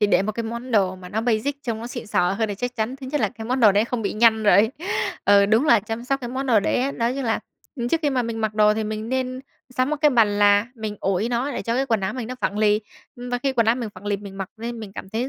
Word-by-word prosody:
thì 210 - +4
để 205 - +3
một 215 +2 -2
cái 230 - -3
món 235 +3 -6
đồ 195 -5 +2
mà 180 -1 -11
nó 215 +4 -2
basic 245 +5 -1
trông 230 -4 -3
nó 230 - -6
xịn 240 -2 -7
sò 180 -3 +1
hơn 220 +2 -1
thì 205 - -3
chắc 245 +5 -4
chắn 225 +4 -2
thứ 265 -1 -9
nhất 295 +2 -1
là - - +2
cái 225 -3 -10
món 255 +3 -1
đồ 215 -4 +7
đấy 205 +2 +3
không 235 -1 -3
bị 200 - -1
nhăn 220 0 +4
rồi. 210 +1 +5 0.5
Ừ, 200 0 +6
đúng 220 +6 +3
là 235 -7 +6
chăm 225 +4 -5
sóc 275 +2 -1
cái 240 - -5
món 265 +2 -3
đồ 230 -5 +4
đấy - - 0
ấy. 275 +1 -1
Nói 235 0 -1
chung 275 -1 -3
là, 225 -1 0 0.4
ừm, 240 -2 -2
trước 325 +5 +1
khi 295 - +2
mà 255 -2 +1
mình 230 -1 -4
mặc 215 -1 -1
đồ 210 0 +4
thì 220 0 -2
mình 215 +1 -4
nên 255 0 -2 0.4
sắm 255 +2 +1
một 305 - 0
cái 300 -1 +5
bàn 215 -5 +3
là, 205 +1 +5
mình 215 -3 -5
ủi 195 +3 0
nó 245 +4 -1
để - - -4
cho 230 - -1
cái 265 +2 0
quần 225 -5 +1
áo 190 - -2
mình 250 -3 -5
nó 255 - -4
phẳng 205 - -1
lì. 210 0 +3 0.4
Ừm, 245 0 -7
và 245 - 0
khi 270 +2 -1
quần 230 -3 +2
áo 225 - +4
mình 240 -3 -4
phẳng 195 +3 -11
lì, 205 - +1
mình 200 -1 -10
mặc 195 -2 -4
lên 230 +1 -6
mình 210 -3 -8
cảm 190 - -8
thấy 230 +6 -2
225 Hz, 320 wpm, -23 LUFS, 210-250 Hz, 0.5 s, đồ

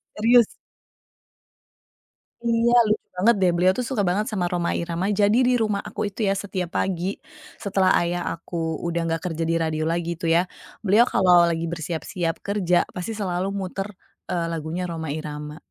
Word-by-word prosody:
Serius. 235 +1 +5 2.0
Iya, 230 +1 +3
lucu 215 0 -1
banget, 225 +5 +4
deh. 180 - +5
Beliau 185 +2 +4
tuh 250 - -1
suka 220 -7 0
banget 195 +4 +1
sama 190 -5 -1
Rhoma 175 -1 0
Irama, 170 +3 -2
jadi 205 +2 +3
di 250 - +4
rumah 210 -3 0
aku - - -6
itu 205 - -8
ya, - - +3
setiap 185 -4 -3
pagi, 190 +1 -1 0.4
setelah 195 -3 +2
ayah 175 +1 -1
aku 165 -1 -4
sudah 170 0 -1
nggak 165 0 -1
kerja 165 -1 -2
di 165 - +2
radio 160 -1 -1
lagi 170 0 -1
tuh 165 - 0
ya, 175 - +5 0.4
beliau 215 +5 +6
kalau 175 -2 +5
lagi 165 0 -1
bersiap-siap 165 +1 -3
kerja, 185 -4 +2
pasti 180 +5 -4
selalu 185 -1 -1
muter, 195 0 -4 0.4
eee, 175 -2 0
lagunya 165 +3 -3
Rhoma 160 -3 -4
Irama. 150 0 -5
180 Hz, 165 wpm, -24 LUFS, 165-200 Hz, 2.0 s, beliau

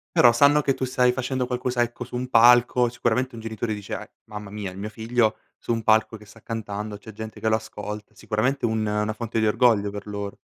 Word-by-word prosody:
Però, 120 -1 +7
sanno 140 +5 +5
che 140 -1 +1
tu 130 - -5
stai 125 -1 +2
facendo 130 0 -2
qualcosa, 125 0 -1
ecco, 120 0 -2
su 125 - -6
un 125 +1 -3
palco. 120 0 +5
Sicuramente, 120 +2 -1
un - - -7
genitore 110 0 -3
dice: 105 -2 -7
"Eh, - - -6
mamma 105 -2 -8
mia, 100 -2 -5
è - - -12
mio 100 +3 -5
figlio, 110 0 0 0.2
su - - -5
un 115 -1 -1
palco 110 0 +3
che 105 - -16
sta 110 +3 -17
cantando, 105 -2 -5
c'è 110 +1 -12
gente 110 +1 -8
che - - -2
lo 110 - +4
ascolta." 105 -1 -7
Sicuramente 125 +5 -1
un 110 -1 0
una 105 +1 -1
fonte 115 0 -3
di 110 - +2
orgoglio 105 -2 +3
per 105 +1 -8
loro. 100 -1 -5
110 Hz, 230 wpm, -24 LUFS, 105-125 Hz, 0.2 s, Però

